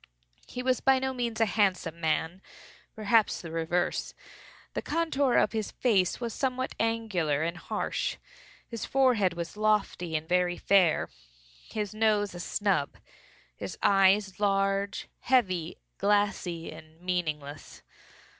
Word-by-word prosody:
He 250 - -5
was 255 -1 +1
by 265 0 +5
no 265 0 -1
means 235 -3 -3
a 225 - +5
handsome 185 -6 0
man—perhaps 195 +6 -1
the 165 - -8
reverse. 165 +2 -1 0.6
The - - -2
contour 285 -6 +1
of - - +4
his 220 -2 -2
face 200 -8 +1
was 235 -3 -3
somewhat 255 +1 -2
angular 200 -10 0
and 170 +1 -2
harsh. - - -3 0.5
His 230 -3 -6
forehead 245 -9 +3
was 170 +2 -5
lofty 210 -6 0
and 155 +1 -2
very 180 0 +1
fair; 185 -5 +3 0.6
his 210 -2 -3
nose 215 -2 +1
a 175 - -8
snub; 185 -5 0 0.6
his - - -6
eyes 195 0 +4
large, 195 0 0
heavy, 185 -10 +1 0.2
glassy, 200 -5 0
and 155 0 -13
meaningless. 155 -5 -4
195 Hz, 125 wpm, -28 LUFS, 175-225 Hz, 0.6 s, by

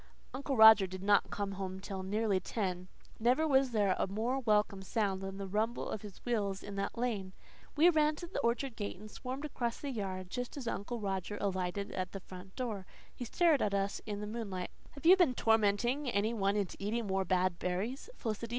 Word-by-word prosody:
Uncle 270 0 -2
Roger 220 -3 +9
did 185 +1 -7
not 205 0 +4
come 200 -1 -3
until 190 0 -5
nearly 205 +1 +1
ten. 185 -4 -3 0.3
Never 250 +8 +3
was 270 -2 +4
there 205 -5 +2
a - - +1
more 225 +7 -1
welcome 210 -5 +2
sound 195 -1 -1
than 195 0 -5
the 200 - -4
rumble 215 +5 -1
of 210 - -4
his 205 -3 -10
wheels 205 -5 -1
in 205 - -7
the 200 0 -1
lane. 215 -6 -2 0.4
We 320 +3 +6
ran 310 -3 +4
to 345 - -7
the 345 - -4
orchard 240 +1 0
gate 205 -4 -4
and 215 +2 -11
swarmed 260 +6 -5
across 240 -5 -2
the 285 - -4
yard, 185 -5 -4
just 245 +2 -4
as 260 -4 -5
Uncle 230 +2 -3
Roger 195 0 -3
alighted 190 0 -2
at 185 -1 -3
the 195 - -4
front 185 +1 -11
door. 220 -7 -4 0.3
He 245 - -6
stared 320 +2 +3
at 200 -1 +1
us 195 0 -1
in 205 -1 -3
the - - -3
moonlight. 205 -4 -4 0.2
"Have 285 +2 -12
you 360 +3 +9
tormented 240 - +2
any 210 +3 +2
one 200 -2 +1
into 200 -3 -2
eating 220 +3 -1
more 190 -1 0
bad 185 -1 +1
berries, 200 - -3
Felicity?" 225 0 -4
210 Hz, 200 wpm, -33 LUFS, 195-245 Hz, 0.4 s, Roger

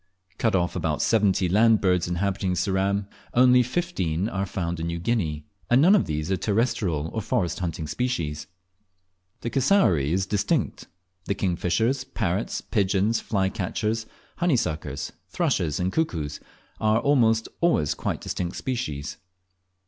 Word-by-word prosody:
Cut 110 -4 +2
of 85 -2 0
about - - -1
seventy 100 -4 +2
land 110 +4 +4
birds 90 -3 +2
inhabiting 95 +1 -1
Ceram, 95 +3 0 0.3
only 125 0 +6
fifteen 120 - -1
are 100 -2 -2
found 85 -2 -3
in 80 - -2
New 85 0 -2
Guinea, 85 -7 -1 0.2
and 120 - +5
none 175 +8 +6
of 205 - +3
these 75 +2 -2
are 95 - +2
terrestrial 100 - 0
or 110 - -1
forest 110 -5 -1
haunting 85 -3 -3
species. 80 - -2 0.9
The 120 - -3
cassowary 125 - +3
is 95 +2 +1
distinct; 100 +1 -1 0.4
the 100 - -1
kingfishers, 95 +9 0
parrots, 105 -6 -2
pigeons, 100 +2 +1
flycatchers, 105 +3 -1 0.3
honeysuckers, 80 - -1 0.2
thrushes, 75 -3 0
and 90 +1 -1
cuckoos, 80 - -1 0.4
are 110 0 +3
almost 115 -5 +3
always 160 - +2
quite - - -3
distinct 90 -1 -3
species. 80 - -3
95 Hz, 135 wpm, -25 LUFS, 85-115 Hz, 0.9 s, only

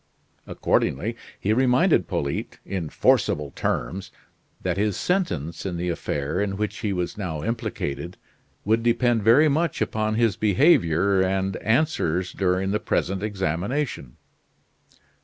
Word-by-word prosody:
Accordingly, 105 - 0 0.2
he 105 - +1
reminded 125 - +3
Polyte, 70 0 -3
in 90 -5 -4
forcible 75 -1 +2
terms, 95 +7 -3 0.5
that 90 -2 0
his 100 -1 0
sentence 85 - -1
in 90 -3 -3
the 90 +1 -2
affair 75 +1 -2
in 100 -1 -2
which 105 +1 -2
he 105 - -1
was 90 +2 -3
now 80 -6 -4
implicated 90 -6 -3 0.5
would 110 +2 +2
depend 120 0 +2
very 120 +9 +6
much 155 +1 0
upon 110 0 -1
his 115 -3 +2
behavior 100 - +3
and 95 0 0
answers 110 - 0
during 95 0 0
the 105 - +1
present 95 -1 -1
examination. 100 - -2
100 Hz, 125 wpm, -24 LUFS, 90-115 Hz, 0.5 s, very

